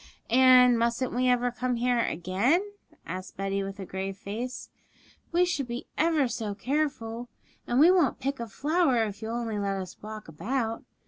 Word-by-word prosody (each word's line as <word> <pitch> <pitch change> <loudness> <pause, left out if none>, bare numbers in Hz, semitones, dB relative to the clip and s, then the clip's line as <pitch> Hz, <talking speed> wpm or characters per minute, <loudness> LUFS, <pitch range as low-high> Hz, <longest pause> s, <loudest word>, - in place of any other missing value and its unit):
'And 250 -1 +7
mustn't 235 +2 0
we 250 +1 +2
ever 245 0 +2
come 250 0 -1
here 245 0 +1
again?' 235 - +1 0.3
asked 185 0 -7
Betty, 195 0 -1
with 195 +1 -6
a 190 - -5
grave 190 +1 -4
face. 230 +6 -6 0.6
'We 350 +1 +4
should 290 -7 -2
be 240 +1 -5
ever 315 -4 +2
so 215 -4 -4
careful, 245 -3 -2 0.4
and 240 +2 +1
we 325 +5 +8
won't 340 -10 +2
pick 275 0 -2
a 235 - -4
flower 285 - +2
if 205 -1 -5
you'll 225 +1 -3
only 225 -3 -2
let 200 -1 -1
us 185 -1 -8
walk 215 0 -8
about. 225 - -2
240 Hz, 175 wpm, -28 LUFS, 205-260 Hz, 0.6 s, we